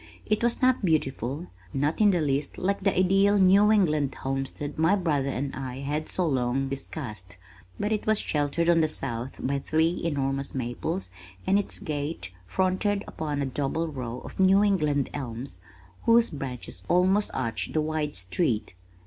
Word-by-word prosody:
It 215 - +1
was 240 +2 +1
not 255 -3 +4
beautiful, 145 - 0 0.3
not 145 +8 0
in 210 - +7
the 180 -4 +2
least 140 -1 -1
like 200 +2 0
the 195 0 +1
ideal 195 +2 +4
New 200 +2 +6
England 155 -9 +2
homestead 135 +2 -4
my 165 +5 +4
brother 150 -8 0
and 135 +1 -3
I 130 -1 -5
had 150 +3 -2
so 180 - 0
long 135 -1 0
discussed, 110 - -7 0.4
but 210 - -1
it 215 -1 -1
was 215 0 +4
sheltered 150 0 0
on 170 -1 +5
the 155 - +3
south 130 -4 -4
by 140 +1 -1
three 160 +4 +1
enormous 140 -4 -1
maples 130 - -3 0.3
and 195 +1 +4
its 205 - -1
gate 145 - -4
fronted 190 - +1
upon 145 -2 -3
a - - -1
double 145 +5 -1
row 125 -4 -5
of - - -11
New 190 +2 +6
England 150 -9 +1
elms 120 -6 -6 0.5
whose 230 0 +5
branches 135 -5 -6
almost 190 +4 +3
arched 115 -4 -2
the 155 - +2
wide 155 -1 -2
street. 105 - -1
150 Hz, 165 wpm, -27 LUFS, 135-185 Hz, 0.5 s, in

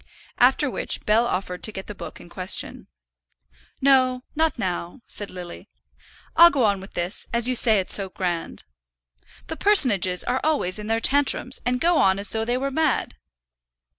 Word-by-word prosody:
After - - +4
which - - -5
Bell 225 +3 +2
offered 185 -2 -4
to 215 - 0
get 190 -2 -8
the 210 - -9
book - - -10
in - - -14
question. 185 +1 -3 0.9
"No, 255 -2 +2
not 320 -1 0
now," 180 +2 -5
said 205 - -1
Lily. 180 -1 -10 0.7
"I'll 340 +1 +8
go 280 -6 -1
on 200 -3 0
with 195 - -14
this, 175 +4 -3
as 235 0 +2
you 255 - 0
say 225 -3 +5
it's 185 - +1
so 195 -2 +3
grand. 175 -3 -5 0.8
The 320 - -7
personages 210 - +4
are 255 +2 -2
always 245 -12 0
in 210 - -8
their 225 0 0
tantrums, 275 -1 +1
and 250 0 -1
go 340 +2 +2
on 190 0 +2
as 200 0 +1
though 220 0 -3
they 240 +2 -1
were 275 +2 -3
mad. 310 +1 -1
225 Hz, 175 wpm, -22 LUFS, 190-265 Hz, 0.9 s, I'll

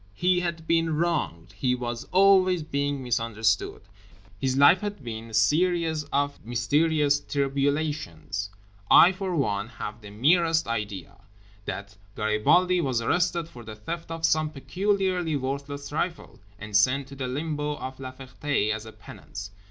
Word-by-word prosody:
He 180 - +2
had 170 -2 -3
been 165 -1 +2
wronged. 150 - -1
He 125 +6 +1
was 120 -1 -4
always 185 -2 +4
being 140 -2 -2
misunderstood. 115 -4 0 0.6
His 130 +3 0
life 145 +6 +6
had 205 -8 -5
been 115 -1 -6
a - - -13
series 160 +6 +2
of 145 0 -1
mysterious 145 +5 +2
tribulations. 140 - -2 0.4
I 175 - +8
for 190 -1 -3
one 105 -8 0
have 115 -1 -7
the 105 - -10
merest 165 - +3
idea 100 -4 -4 0.5
that 100 +1 -6 0.2
Garibaldi 170 +13 +3
was 130 -6 0
arrested 170 +6 0
for 120 -7 -12
the 110 -1 -8
theft 165 +11 -6
of 165 0 -2
some 155 -1 +2
peculiarly 185 +2 -1
worthless 140 +1 -4
trifle, 170 +4 -4 0.2
and 105 0 -7
sent 130 +6 +3
to 140 - -10
the 130 -1 -4
Limbo 150 +2 -2
of 130 0 -7
La 130 -1 -6
Ferté 130 -3 -2
as 110 +1 -6
a - - -9
penance. 100 -2 -10
140 Hz, 145 wpm, -26 LUFS, 115-165 Hz, 0.6 s, I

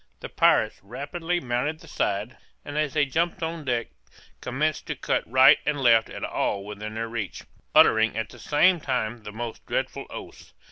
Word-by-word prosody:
The - - -6
pirates - - +3
rapidly 155 - -3
mounted 135 +3 -2
the 165 - -15
side, 105 -3 -2 0.3
and 145 - -7
as 150 -2 -1
they 150 -1 +4
jumped 165 +5 -1
on 160 -1 -4
deck, 120 -3 -1 0.5
commenced 150 +5 -1
to - - -3
cut - - 0
right 130 +4 +7
and 150 -1 -1
left 115 -4 +4
at - - -7
all 100 -1 -1
within 105 +1 -7
their 115 +1 -2
reach, 115 -4 -5 0.3
uttering 110 0 +5
at 110 -1 -2
the - - -14
same 175 +4 +3
time 120 -5 -2
the 105 - -8
most 115 +1 -6
dreadful - - -2
oaths. - - -10
125 Hz, 180 wpm, -25 LUFS, 110-150 Hz, 0.5 s, right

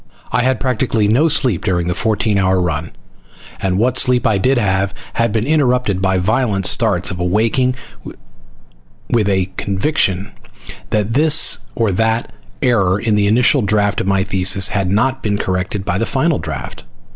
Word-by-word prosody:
I 125 - +1
had 130 +1 0
practically 115 -4 0
no 125 +10 +3
sleep 130 - +1
during 90 -4 0
the 90 - -1
fourteen 110 0 0
hour 95 -1 +2
run, 80 -2 -2 0.7
and 95 -1 0
what 125 +4 +1
sleep 125 -2 +2
I 105 -3 +2
did 130 +6 +2
have 95 -3 0 0.2
had 115 -1 0
been 110 +1 -1
interrupted 125 -9 +1
by 95 -1 +1
violent 105 0 0
starts 100 -3 +2
of 90 - -6
awaking 115 +8 0 1.4
with 110 -4 +1
a 95 -1 0
conviction 100 - -1 0.6
that 105 +1 -1
this 155 +3 +4 0.2
or 115 -3 0
that 110 +4 -1 0.3
error 100 -7 +2
in 110 0 -1
the 105 -1 +2
initial 125 +6 +3
draft 105 -1 0
of - - -4
my 95 -1 +1
thesis 95 0 +2
had 100 -2 -1
not 130 +7 0
been 105 -2 -1
corrected 95 +1 -3
by 90 +2 -1
the 115 - -1
final 150 +2 0
draft. 70 -6 -7
105 Hz, 165 wpm, -16 LUFS, 95-125 Hz, 1.4 s, this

